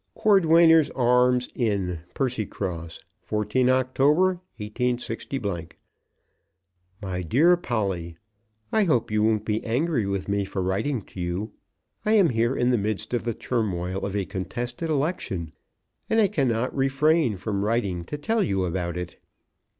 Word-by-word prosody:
Cordwainers' 165 Hz, -6 st, +5 dB
Arms 125 Hz, 0 st, +3 dB
Inn, 100 Hz, -7 st, -1 dB, 0.2 s
Percycross, 95 Hz, -, -3 dB, 0.2 s
14 105 Hz, +4 st, 0 dB
October, 145 Hz, +8 st, +2 dB, 0.2 s
186. 120 Hz, +2 st, -3 dB, 1.8 s
MY 90 Hz, -1 st, -3 dB
DEAR 145 Hz, -, +4 dB
POLLY, 95 Hz, -, -3 dB, 0.5 s
I 215 Hz, -2 st, +3 dB
hope 125 Hz, -, +1 dB
you 105 Hz, 0 st, +2 dB
won't 110 Hz, -1 st, +2 dB
be 110 Hz, 0 st, -1 dB
angry 125 Hz, -1 st, 0 dB
with 100 Hz, -1 st, -2 dB
me 100 Hz, 0 st, 0 dB
for 95 Hz, -1 st, -3 dB
writing 105 Hz, +6 st, -1 dB
to 95 Hz, -, -9 dB
you. 90 Hz, +5 st, -3 dB, 0.5 s
I 215 Hz, -, +2 dB
am 200 Hz, -6 st, +5 dB
here 120 Hz, +2 st, +1 dB
in 125 Hz, +1 st, +2 dB
the 120 Hz, -, +2 dB
midst 110 Hz, +2 st, -3 dB
of 120 Hz, -2 st, -1 dB
the 115 Hz, -2 st, -1 dB
turmoil 95 Hz, -6 st, -2 dB
of 100 Hz, 0 st, -3 dB
a 100 Hz, -2 st, 0 dB
contested 120 Hz, -, -4 dB
election, 140 Hz, -, -2 dB, 0.6 s
and 225 Hz, -, +3 dB
I 205 Hz, -3 st, +4 dB
cannot 130 Hz, -, 0 dB
refrain 135 Hz, -, +2 dB
from 100 Hz, +1 st, -2 dB
writing 100 Hz, -6 st, -1 dB
to 150 Hz, -, -5 dB
tell 220 Hz, +10 st, 0 dB
you 95 Hz, -, 0 dB
about 85 Hz, -1 st, -3 dB
it. 90 Hz, -1 st, -6 dB
115 Hz, 140 wpm, -25 LUFS, 100-135 Hz, 1.8 s, Cordwainers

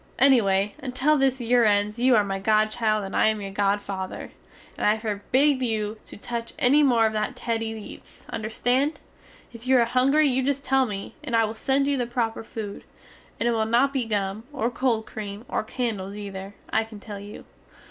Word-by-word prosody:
Ennyway 210 Hz, -7 st, +4 dB
until 260 Hz, +3 st, +1 dB
this 265 Hz, -2 st, +2 dB
yere 240 Hz, 0 st, +3 dB
ends 210 Hz, +1 st, +2 dB
you 250 Hz, 0 st, +5 dB
are 210 Hz, -, +4 dB
my 195 Hz, -1 st, -3 dB
godchild 215 Hz, +1 st, +2 dB
and 195 Hz, -, -6 dB
I -, -, +4 dB
am 220 Hz, -1 st, +1 dB
your 195 Hz, -1 st, -6 dB
godfather, 195 Hz, -1 st, -2 dB, 0.4 s
and -, -, 0 dB
I 210 Hz, +1 st, +3 dB
forbid 255 Hz, +6 st, +1 dB
you 215 Hz, -3 st, -2 dB
to -, -, -9 dB
tuch 235 Hz, +2 st, -5 dB
enny 275 Hz, +4 st, +4 dB
more 240 Hz, -6 st, +4 dB
of 220 Hz, -, +1 dB
that 215 Hz, +3 st, -2 dB
Teddys 225 Hz, -2 st, -2 dB
eats, 215 Hz, -, -12 dB
understand? 245 Hz, +7 st, 0 dB, 0.5 s
If 235 Hz, +1 st, -9 dB
you 260 Hz, 0 st, +5 dB
are 235 Hz, -, +4 dB
hungry 270 Hz, +6 st, +3 dB
you 260 Hz, -1 st, +1 dB
just 275 Hz, +1 st, -1 dB
tell 265 Hz, -1 st, +3 dB
me, 200 Hz, -2 st, -6 dB
and 250 Hz, -6 st, -2 dB
I 225 Hz, -1 st, +4 dB
will 215 Hz, -, -4 dB
send 270 Hz, +4 st, +1 dB
you 285 Hz, -1 st, +1 dB
the 245 Hz, -2 st, -1 dB
proper 230 Hz, -2 st, -2 dB
food; 215 Hz, -2 st, -7 dB, 0.6 s
and 235 Hz, -, +1 dB
it -, -, +3 dB
will 220 Hz, -1 st, 0 dB
not 250 Hz, +5 st, +3 dB
be 260 Hz, -4 st, 0 dB
gum, 205 Hz, 0 st, -2 dB
or 255 Hz, -4 st, -1 dB
cold 235 Hz, -3 st, 0 dB
cream 210 Hz, +1 st, -7 dB
or -, -, -1 dB
candels 210 Hz, -5 st, -3 dB
ether, 200 Hz, -1 st, -7 dB, 0.2 s
I 220 Hz, -, +3 dB
can 220 Hz, -2 st, -11 dB
tell 205 Hz, -1 st, -8 dB
you. 205 Hz, +1 st, -10 dB
225 Hz, 200 wpm, -25 LUFS, 210-255 Hz, 0.6 s, you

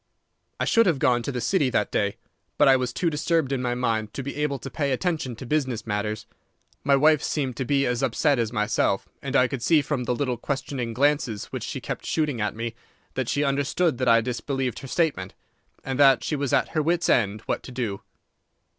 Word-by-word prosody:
"I -, -, +1 dB
should 230 Hz, -1 st, +4 dB
have 165 Hz, -5 st, +3 dB
gone 125 Hz, -2 st, +2 dB
to 130 Hz, -, -3 dB
the 125 Hz, -, -3 dB
City 140 Hz, -, +2 dB
that -, -, 0 dB
day, -, -, 0 dB, 0.4 s
but 145 Hz, -, +5 dB
I 135 Hz, -, +7 dB
was 125 Hz, -1 st, -1 dB
too 170 Hz, +6 st, 0 dB
disturbed 155 Hz, -1 st, 0 dB
in 135 Hz, -2 st, 0 dB
my 120 Hz, -1 st, -1 dB
mind 110 Hz, -4 st, -1 dB
to 135 Hz, -, -4 dB
be 140 Hz, -, -5 dB
able 150 Hz, -2 st, 0 dB
to 135 Hz, -, -8 dB
pay 140 Hz, -3 st, -1 dB
attention 135 Hz, -3 st, -1 dB
to 130 Hz, -, -9 dB
business 130 Hz, -5 st, -1 dB
matters. 105 Hz, 0 st, -2 dB, 0.6 s
My 140 Hz, 0 st, +4 dB
wife 150 Hz, +1 st, +4 dB
seemed 135 Hz, -7 st, -2 dB
to 130 Hz, -, -2 dB
be 140 Hz, +1 st, +2 dB
as 125 Hz, -1 st, 0 dB
upset 145 Hz, -5 st, +2 dB
as 115 Hz, -2 st, 0 dB
myself, 105 Hz, -3 st, 0 dB
and 140 Hz, 0 st, -4 dB
I 130 Hz, -2 st, +5 dB
could 135 Hz, -1 st, -5 dB
see 155 Hz, +3 st, +4 dB
from 135 Hz, -3 st, -2 dB
the 125 Hz, -, 0 dB
little 125 Hz, -2 st, -1 dB
questioning 130 Hz, -3 st, -3 dB
glances 140 Hz, -6 st, +1 dB
which -, -, -4 dB
she -, -, -4 dB
kept -, -, -6 dB
shooting 150 Hz, -7 st, 0 dB
at 105 Hz, 0 st, -1 dB
me 115 Hz, +1 st, -4 dB, 0.4 s
that 130 Hz, -3 st, -2 dB
she 145 Hz, -, +1 dB
understood 140 Hz, +1 st, +1 dB
that 130 Hz, -, 0 dB
I 115 Hz, -1 st, +6 dB
disbelieved 125 Hz, +1 st, -3 dB
her 135 Hz, -, -9 dB
statement, 130 Hz, -, -1 dB, 0.5 s
and 135 Hz, 0 st, -3 dB
that 135 Hz, -2 st, +6 dB
she 155 Hz, -, -1 dB
was 140 Hz, -2 st, -2 dB
at -, -, +2 dB
her 155 Hz, -, 0 dB
wits' 170 Hz, +3 st, +1 dB
end 105 Hz, -3 st, +2 dB
what -, -, -2 dB
to -, -, -10 dB
do. 115 Hz, -6 st, -3 dB
130 Hz, 220 wpm, -25 LUFS, 120-145 Hz, 0.6 s, I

